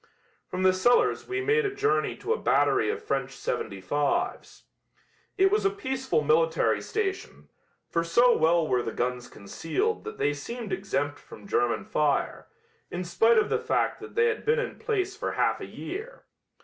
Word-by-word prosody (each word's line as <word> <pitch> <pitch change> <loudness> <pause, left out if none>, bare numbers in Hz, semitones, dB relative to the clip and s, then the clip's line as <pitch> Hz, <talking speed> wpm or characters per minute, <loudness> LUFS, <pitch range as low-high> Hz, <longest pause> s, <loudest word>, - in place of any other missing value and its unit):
From 185 +1 -3
the 185 0 +5
cellars 185 +7 +2
we 390 +1 -2
made 440 +3 +2
a 405 - -1
journey 415 0 +1
to 455 - -1
a - - -4
battery - - +2
of 440 0 -3
French - - -1
.75's. - - -2 0.7
It 385 0 +4
was 420 - +2
a 395 - +4
peaceful 265 - -1
military 160 +2 +2
station, 390 -3 -4 0.4
for 170 - 0
so 240 +9 +4
well 165 0 +3
were 125 -3 +1
the 115 - -4
guns 125 0 -2
concealed 270 - -3
that 440 - -7
they 145 - +1
seemed 215 +8 -6
exempt 145 -7 -2
from - - -14
German 120 -11 0
fire, 150 -2 0 0.4
in 180 +1 -4
spite 225 +6 +3
of 215 - +3
the - - +1
fact - - 0
that - - -11
they 460 - +4
had 450 -2 0
been 460 +2 +2
in - - -3
place 385 -4 -1
for - - -3
half - - +1
a - - -6
year. 445 +6 -7
240 Hz, 175 wpm, -27 LUFS, -, 0.7 s, the